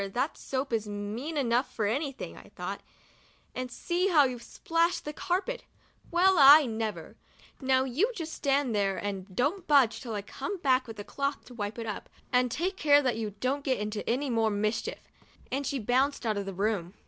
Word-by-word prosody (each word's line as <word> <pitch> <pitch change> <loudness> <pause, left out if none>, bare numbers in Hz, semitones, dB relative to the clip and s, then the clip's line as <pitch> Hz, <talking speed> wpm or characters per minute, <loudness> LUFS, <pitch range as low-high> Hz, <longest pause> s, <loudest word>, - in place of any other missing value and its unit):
that 265 +5 0
soap 265 -1 -3
is 220 -2 0
mean 210 +10 -4
enough 250 -1 +1
for 215 - -1
anything,* 275 +5 -2
I - - -14
thought), - - -5 0.7
and 255 0 -4
see 345 +9 -1
how 320 -6 +6
you've 250 -3 -2
splashed 335 +7 0
the 300 - -4
carpet! 390 +11 -2 0.5
Well, 365 +2 +4
I 285 +2 +9
never! 220 -2 -4 0.4
Now 260 0 +3
just 370 - 0
you 325 - -2
stand 280 -5 0
there 195 -2 +1
and 195 -2 -5
don't 325 - 0
budge 275 -6 +4
till 230 -4 -5
I 205 - -3
come 360 - -5
back 260 -6 +2
with 225 -2 -8
a 205 - -5
cloth 280 +5 -3
to 250 - -12
wipe 210 -1 -4
it 230 - -4
up, 210 -2 -5 0.2
and 250 0 +4
take 355 +10 -2
care 290 -3 +5
that 250 -3 +1
you 215 -3 -4
don't 275 +3 -1
get 260 -2 +1
into 210 0 -4
any 260 +3 0
more 225 -1 +2
mischief! 215 +2 -2 0.2
' - - -29
and 275 +1 -1
she 280 - -1
bounced 260 +4 +1
out 220 -1 +1
of 200 -1 -3
the 195 - -4
room. 195 -2 -1
255 Hz, 200 wpm, -29 LUFS, 220-290 Hz, 0.7 s, I